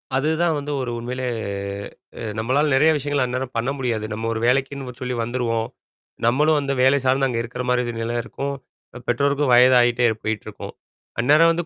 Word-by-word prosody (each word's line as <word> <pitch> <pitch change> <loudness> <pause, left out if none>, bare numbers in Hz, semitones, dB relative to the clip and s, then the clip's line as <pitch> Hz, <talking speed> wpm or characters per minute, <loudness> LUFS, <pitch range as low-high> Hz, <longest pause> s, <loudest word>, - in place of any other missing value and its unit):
அதுதான் 160 +4 +1
வந்து, 145 +1 -4
ஒரு 120 -2 -3
உண்மையிலே, 125 +2 -4 1.1
நம்மளால 135 +7 +1
நெறய 155 +4 +5
விஷயங்கள், 145 -1 0
அந்நேரம் 125 0 -4
பண்ண 115 +3 0
முடியாது. 115 -5 -1
நம்ம 110 +1 -3
ஒரு 110 - -3
வேலைக்குன்னு 135 -1 -1
சொல்லி 125 -1 -2
வந்துருவோம். 115 -1 -1 0.6
நம்மளும் 150 +6 +3
வந்து 140 -1 -1
வேலை 135 +2 +5
சார்ந்து, 135 +1 +3
அங்க 120 -3 -2
இருக்குற 125 +2 -5
மாரி 125 0 +2
ஒரு 120 - -3
நில 115 +1 -2
இருக்கும். 140 +4 -4 0.5
பெற்றோருக்கும் 140 +2 +1
வயதாகிட்டே 120 -1 +5
போயிட்டுருக்கும். 110 -1 -5 0.5
அந்நேரம் 150 +7 +5
வந்து 170 0 -2
130 Hz, 155 wpm, -22 LUFS, 120-140 Hz, 1.1 s, நெறய